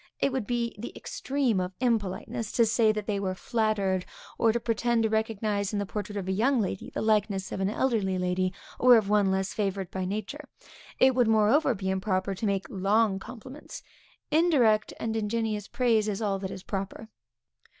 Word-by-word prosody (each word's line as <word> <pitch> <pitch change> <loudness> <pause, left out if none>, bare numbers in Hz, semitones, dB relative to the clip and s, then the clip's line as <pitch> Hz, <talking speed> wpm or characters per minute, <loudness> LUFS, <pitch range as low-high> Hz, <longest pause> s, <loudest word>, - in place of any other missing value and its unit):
It 275 - +1
would 260 -6 -2
be 235 -1 -1
the 235 - -6
extreme 265 -7 -1
of 180 0 -3
impoliteness, 225 -1 -1
to 235 - +4
say 225 0 +3
that 215 -1 -4
they 205 -2 -1
were 190 -1 -2
flattered, 200 -4 0 0.4
or 225 - +4
to 235 - -1
pretend 230 0 +1
to 220 - +2
recognize 215 -2 -1
in - - 0
the 205 - -1
portrait 205 +1 -5
of 190 -2 -4
a - - 0
young 240 +7 +2
lady, 195 -3 -3
the - - -4
likeness 210 -3 +1
of - - -4
an 190 0 +1
elderly 210 -5 0
lady, 180 0 0 0.3
or 250 -1 +7
of 210 -3 0
one 205 -2 +3
less 190 0 -1
favored 195 -3 -2
by 190 -1 -3
nature. 215 +9 -5 0.5
It 260 0 +5
would 245 -2 +3
moreover 225 +5 +3
be 190 -1 -2
improper 190 0 -1
to 210 +3 -3
make 195 -1 0
long 200 +1 +1
compliments; 255 +6 -10 0.5
indirect, 275 -10 +3
and 225 0 -2
ingenious 215 -1 -1
praise, 230 -4 +2
is 205 -2 -2
all 200 -3 -1
that 190 -1 -4
is 185 - -8
proper. 195 +2 -5
215 Hz, 190 wpm, -28 LUFS, 195-230 Hz, 0.5 s, or